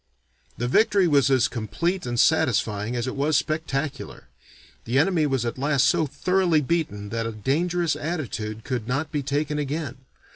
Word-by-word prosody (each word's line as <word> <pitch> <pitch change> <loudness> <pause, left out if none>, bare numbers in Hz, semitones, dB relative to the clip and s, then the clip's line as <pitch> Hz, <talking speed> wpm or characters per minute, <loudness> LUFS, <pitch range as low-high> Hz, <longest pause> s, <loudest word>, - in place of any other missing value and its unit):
'" 60 -1 -37
The 120 - -1
victory 195 - +3
was 140 -3 +4
as 130 -3 +4
complete 130 - -2
and 120 -1 -2
satisfying 105 +3 +2
as 120 -1 -1
it 130 - -4
was 145 +2 +2
spectacular; 155 -3 -3 0.6
the 120 +3 0
enemy 160 0 +3
was 135 -4 0
at 120 +2 -3
last 140 -1 +2
so 165 -3 +2
thoroughly 170 +3 +1
beaten 135 -10 -2
that 115 +1 -2
a - - -3
dangerous 165 - 0
attitude 115 - -4
could 125 -5 -3
not 135 +5 -2
be 145 - -1
taken 145 +2 -1
again. 145 -2 -3
140 Hz, 170 wpm, -24 LUFS, 120-160 Hz, 0.6 s, was